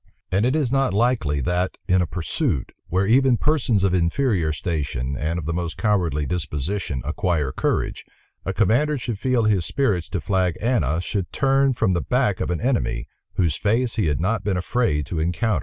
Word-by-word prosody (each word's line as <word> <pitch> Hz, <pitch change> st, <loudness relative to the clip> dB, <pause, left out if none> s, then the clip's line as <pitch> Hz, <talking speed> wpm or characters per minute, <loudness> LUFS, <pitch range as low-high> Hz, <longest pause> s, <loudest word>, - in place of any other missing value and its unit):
And 100 Hz, +6 st, +2 dB
it 130 Hz, -, +1 dB
is 145 Hz, -6 st, 0 dB
not 135 Hz, -5 st, +1 dB
likely, 105 Hz, -, +1 dB
that, 90 Hz, +7 st, -1 dB
in 95 Hz, -1 st, +3 dB
a 90 Hz, -, 0 dB
pursuit, 90 Hz, -, -2 dB, 0.2 s
where 95 Hz, +2 st, +1 dB
even 125 Hz, +3 st, +4 dB
persons 125 Hz, -10 st, +1 dB
of 95 Hz, -2 st, +2 dB
inferior 90 Hz, -, +1 dB
station, 70 Hz, -4 st, -3 dB
and 80 Hz, +4 st, -2 dB
of 85 Hz, -, -4 dB
the 85 Hz, -, -1 dB
most 85 Hz, -1 st, -3 dB
cowardly 85 Hz, -9 st, +1 dB
disposition, 75 Hz, -2 st, -3 dB
acquire 80 Hz, -4 st, 0 dB
courage, -, -, -1 dB, 0.4 s
a 95 Hz, -, -2 dB
commander 120 Hz, +10 st, +2 dB
should 120 Hz, -4 st, -4 dB
feel 130 Hz, -1 st, +1 dB
his 105 Hz, -5 st, +2 dB
spirits 100 Hz, -7 st, 0 dB
to 95 Hz, -, -2 dB
flag 95 Hz, -3 st, 0 dB
ana 85 Hz, -, +1 dB
should 95 Hz, 0 st, -3 dB
turn 135 Hz, 0 st, +2 dB
from 95 Hz, -, +1 dB
the 85 Hz, -, 0 dB
back 65 Hz, -, +1 dB
of -, -, -1 dB
an 90 Hz, -, -1 dB
enemy, 115 Hz, -, 0 dB, 0.3 s
whose 85 Hz, -5 st, +1 dB
face 115 Hz, +3 st, +1 dB
he 105 Hz, -, 0 dB
had 75 Hz, -1 st, 0 dB
not 105 Hz, +7 st, 0 dB
been 100 Hz, -3 st, 0 dB
afraid 90 Hz, -, 0 dB
to 80 Hz, +3 st, -3 dB
encounter. 90 Hz, +4 st, 0 dB
95 Hz, 190 wpm, -23 LUFS, 80-115 Hz, 0.4 s, even